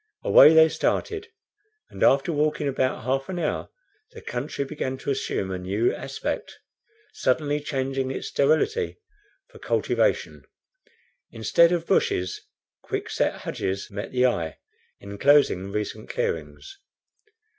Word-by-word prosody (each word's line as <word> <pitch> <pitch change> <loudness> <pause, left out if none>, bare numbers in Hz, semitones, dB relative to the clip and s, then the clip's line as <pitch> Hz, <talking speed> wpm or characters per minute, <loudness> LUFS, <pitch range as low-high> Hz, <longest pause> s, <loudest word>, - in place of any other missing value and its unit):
Away 160 - +8
they 160 0 +8
started, 425 - -2 0.6
and, - - -10
after 140 +5 +4
walking 150 0 0
about 130 -3 -1
half 135 +2 -1
an 185 - -4
hour, 160 -3 -2 0.4
the - - -10
country 135 +3 -4
began 135 -2 -4
to 140 - -3
assume 100 -7 -2
a 95 - -3
new 100 +6 0
aspect, - - -5 0.6
suddenly 145 +3 0
changing 135 -2 -2
its 135 - -4
sterility 160 - +1 0.5
for - - -14
cultivation. - - 0 0.9
Instead 170 0 +3
of 170 -2 0
bushes, 90 - 0 0.4
quick - - -4
set - - -1
hedges 100 +3 -4
met 100 +1 -6
the 125 0 +2
eye, 85 -10 -1 0.4
inclosing 100 -2 +2
recent 105 +1 -4
clearings. 460 -5 -4
135 Hz, 125 wpm, -25 LUFS, 120-160 Hz, 0.9 s, Away